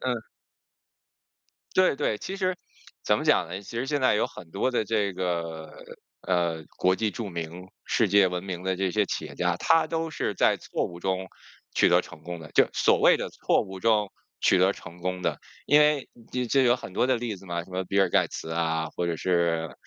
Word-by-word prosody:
嗯。 120 -3 -2 1.5
对 185 -6 +4
对， 105 - -1
其 195 - -6
实， 185 -2 0 0.5
怎 - - +2
么 - - -3
讲 85 - +3
呢？ 95 +4 -6
其 115 +3 -8
实 130 - -1
现 145 0 -1
在 130 - +4
有 - - +1
很 80 - -12
多 100 +8 0
的 115 - +1
这 105 -2 0
个， 85 -3 -3 0.6
嗯， 85 -4 0
国 90 +1 +3
际 110 +2 0
著 110 -4 -5
名、 85 +1 -6 0.2
世 110 -5 +2
界 100 -1 +5
闻 90 0 -3
名 90 -2 -5
的 95 0 -1
这 95 -1 -1
些 105 +1 +2
企 - - -3
业 - - -10
家， 90 -1 +1
他 165 - +3
都 165 0 -2
是 105 - -2
在 - - +3
错 - - -3
误 85 0 -9
中 95 0 -2 0.5
取 - - +4
得 - - +5
成 80 - -13
功 85 -1 -6
的 75 - -11
就 - - +5
所 - - +3
谓 - - +6
的 - - -4
错 - - +1
误 95 -2 -8
中 105 -2 +2 0.3
取 - - +4
得 95 +2 +4
成 90 -1 -12
功 90 +1 -3
的。 - - -1 0.3
因 150 - +6
为 150 -2 +3 0.2
你 125 -1 0
这 135 +3 +3
有 120 -1 +5
很 105 - -9
多 125 - +1
的 130 - +3
例 115 -4 -4
子 95 - -15
嘛， 85 -1 -3
什 90 - -17
么 95 0 -2
比 100 - -2
尔 95 - +2
盖 - - +3
茨 80 - -7
啊， 80 -1 0
或 85 +1 -3
者 85 - -1
是 85 -2 0
95 Hz, 240 characters per minute, -26 LUFS, 85-115 Hz, 1.5 s, 谓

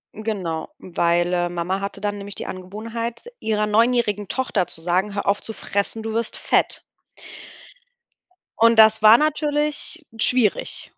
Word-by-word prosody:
hm, 215 - -8
genau, 185 -7 -3
weil, 175 0 0
äh, 175 -1 +1
Mama 175 +3 -2
hatte 200 0 -5
dann 205 0 -2
nämlich 200 0 -7
die - - -6
Angewohnheit, 225 +5 -6 0.2
ihrer 215 -1 0
neunjährigen 215 -2 +2
Tochter 215 -8 -1
zu 165 - -8
sagen: 185 +4 0
„Hör 200 - -3
auf 200 +1 +2
zu 225 - -7
fressen, 205 +3 -3
du 220 0 -4
wirst 230 0 -2
fett.“ - - +1 1.8
Und 230 0 +5
das 220 0 +7
war 220 +2 +9
natürlich 300 +1 -1
schwierig. 225 -2 0
210 Hz, 150 wpm, -22 LUFS, 190-230 Hz, 1.8 s, war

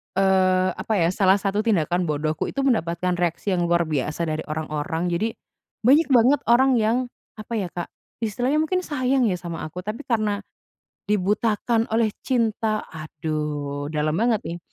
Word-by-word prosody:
eee, 185 -1 +3
apa 220 - -3
ya, 170 -3 +2
salah 190 -1 +4
satu 200 0 -1
tindakan 180 -5 +1
bodohku 155 +1 -1
itu 275 - -2
mendapatkan 180 -8 0
reaksi 175 +3 -1
yang 175 -2 +1
luar 170 0 +3
biasa 155 +1 -2
dari 155 -1 -2
orang-orang. 160 +3 -2
Jadi, 215 +6 -1 0.5
banyak 285 +8 +5
banget 260 +2 +5
orang 255 +3 +5
yang, 220 +2 +2 0.4
apa 215 +2 -8
ya, 190 - -2
Kak, 175 0 -6 0.3
istilahnya 250 +8 +1
mungkin 365 +4 0
sayang 265 -7 +1
ya 190 - +1
sama 170 -2 -6
aku. 180 +4 -8
Tapi 215 +8 -6
karena 215 -4 0 0.7
dibutakan 210 +3 +1
oleh 225 -1 +3 0.2
cinta, 220 -3 0
aduh 150 -2 -4
dalem 150 0 +1
banget 230 -1 +2
nih. 170 - -5
190 Hz, 155 wpm, -23 LUFS, 165-230 Hz, 0.7 s, banyak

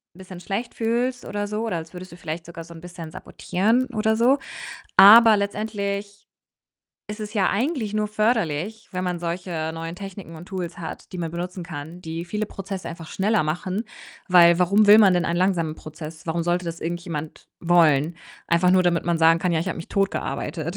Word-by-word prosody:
bisschen 185 -1 -11
schlecht 200 +6 -4
fühlst 240 +2 -1
oder 205 0 -3
so 210 +2 -3
oder 215 -7 -2
als 165 0 -8
würdest 185 +1 -9
du 170 - -12
vielleicht 165 0 -6
sogar 170 0 -9
so 170 - -15
'n 165 - -11
bisschen 175 -2 -9
sabotieren 225 +11 0
oder 220 +1 +2
so. 245 +5 +4 0.6
Aber 220 +3 +9
letztendlich 200 0 -4 0.8
ist 210 +1 -6
es 210 +1 -6
ja 195 -3 +2
eigentlich 235 -1 -1
nur 215 0 0
förderlich, 215 -2 -1
wenn 185 0 -3
man 180 -1 -2
solche 170 -2 -3
neuen 165 +1 -6
Techniken 195 -3 -9
und 160 +2 -11
Tools 180 -3 -5
hat, 165 +3 -8
die 180 - -6
man 165 -2 -3
benutzen 180 +2 -5
kann, 165 0 -8
die 165 0 -5
viele 210 +4 -3
Prozesse 195 -1 -6
einfach 165 -1 -9
schneller 210 -1 +1
machen. 185 +7 -3 0.4
Weil 170 -2 +6
warum 200 +4 +4
will 205 +1 +9
man 205 -4 +6
denn 175 0 +1
einen 170 - -1
langsamen 175 -4 +1
Prozess? 155 +1 -10
Warum 165 +1 -1
sollte 175 +1 0
das 170 0 -5
irgendjemand 165 -2 -5
wollen? 165 -2 +3 0.3
Einfach 170 +2 +3
nur, 185 0 +5
damit 175 -2 +1
man 170 -1 0
sagen 165 +1 +5
kann: 180 0 0
„Ja, 160 - +1
habe 185 +1 -3
mich 165 - -8
tot 195 -1 +1
gearbeitet.“ 170 +2 -4
180 Hz, 195 wpm, -23 LUFS, 170-205 Hz, 0.8 s, Aber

